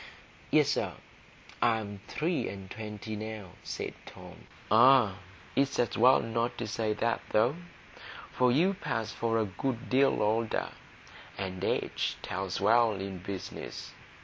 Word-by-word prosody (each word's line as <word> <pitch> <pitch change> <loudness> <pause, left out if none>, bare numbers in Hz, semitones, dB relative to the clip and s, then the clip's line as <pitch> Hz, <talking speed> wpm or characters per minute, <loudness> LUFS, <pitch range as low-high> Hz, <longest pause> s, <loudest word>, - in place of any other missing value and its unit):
"Yes, - - +4
sir; - - 0 0.7
I'm 105 -4 0
three 165 +3 -1
and 95 -1 -9
twenty 110 0 -6
now," 110 -3 -6
said - - -5
Tom. - - -12 0.2
"Ah, 115 -4 +6 0.4
it's 140 0 +2
as 120 - +1
well 125 +3 +6
not 115 +1 -1
to 120 - -3
say 110 0 -1
that, 115 +2 0
though; 115 +6 +3 0.8
for 125 -1 +3
you'd 185 +9 +2
pass 115 -6 -2
for 115 0 0
a 110 - +2
good 120 +6 -4
deal 135 -3 +4
older, 110 +1 0 0.7
and 95 -1 -4
age - - -1
tells 95 0 -3
well 115 -1 +4
in 95 -1 -5
business. 95 +1 -6
110 Hz, 135 wpm, -30 LUFS, 100-120 Hz, 0.8 s, Ah